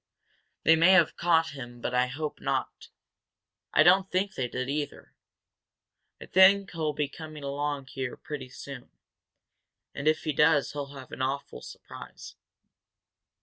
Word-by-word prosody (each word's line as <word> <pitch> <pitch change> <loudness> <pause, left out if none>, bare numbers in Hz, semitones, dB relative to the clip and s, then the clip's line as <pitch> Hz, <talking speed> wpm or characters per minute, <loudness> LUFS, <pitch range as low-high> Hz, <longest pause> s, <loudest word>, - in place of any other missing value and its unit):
They 160 - +6
may 170 +4 +5
have 170 -4 +4
caught 165 -1 +2
him 120 -3 -9
but 125 - -4
I 125 0 +2
hope 150 +4 -5
not. - - -3 0.8
I - - +5
don't 190 +2 +5
think 190 +2 -1
they 125 - -2
did, 125 +1 -4
either. 145 +1 -4 1.1
I - - -9
think 195 +1 +5
he'll 155 -3 -3 0.2
come 155 -1 -9
along 145 0 -3
here 130 -1 -5
pretty 140 -4 -7
soon. 130 0 -10 1.0
And, 140 +1 -4
if 155 0 +2
he 155 - -1
does, 150 -1 +3
he'll 145 -1 -6
have 130 -1 -11
an - - -7
awful 135 - -3
surprise." - - -11
145 Hz, 145 wpm, -28 LUFS, 130-165 Hz, 1.1 s, They